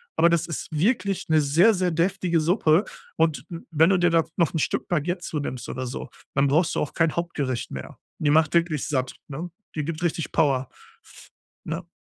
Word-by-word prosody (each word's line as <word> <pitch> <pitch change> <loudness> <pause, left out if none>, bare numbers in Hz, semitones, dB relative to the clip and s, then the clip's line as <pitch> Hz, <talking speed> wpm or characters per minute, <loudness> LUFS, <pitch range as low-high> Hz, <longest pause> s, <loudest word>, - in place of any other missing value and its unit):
aber 170 - +5
das 170 -1 +2
ist 165 - -5
wirklich 200 - 0
'ne 155 -1 +4
sehr, 165 +10 +5
sehr 185 -2 +1
deftige 170 0 +1
Suppe 165 +1 +3 0.3
und 155 -5 +1
w 170 -1 -7
wenn 160 +3 +5
du 195 - +4
dir 175 0 +3
da 165 -1 +4
noch 170 -2 +1
'n 160 - 0
Stück - - -1
Baguette 175 +2 -1
zu 155 -3 -3
nimmst 130 -3 -5
oder 130 0 -4
so, 125 - -6 0.3
dann 140 0 +3
brauchst 155 +5 +2
du - - 0
auch 145 - -3
kein 165 -2 +1
Hauptgericht 145 -8 -2
mehr. 65 - -7 0.2
Die 145 -1 +2
macht 155 0 +4
wirklich 170 -4 +1
satt, 130 -3 -1
ne? 155 +5 -6 0.3
Die 150 -2 -2
gibt 160 +1 -4
richtig 165 -2 -1
Power, 135 -5 +2 0.3
f - - -16 0.3
ne? 170 +3 -5
165 Hz, 205 wpm, -25 LUFS, 145-175 Hz, 0.3 s, aber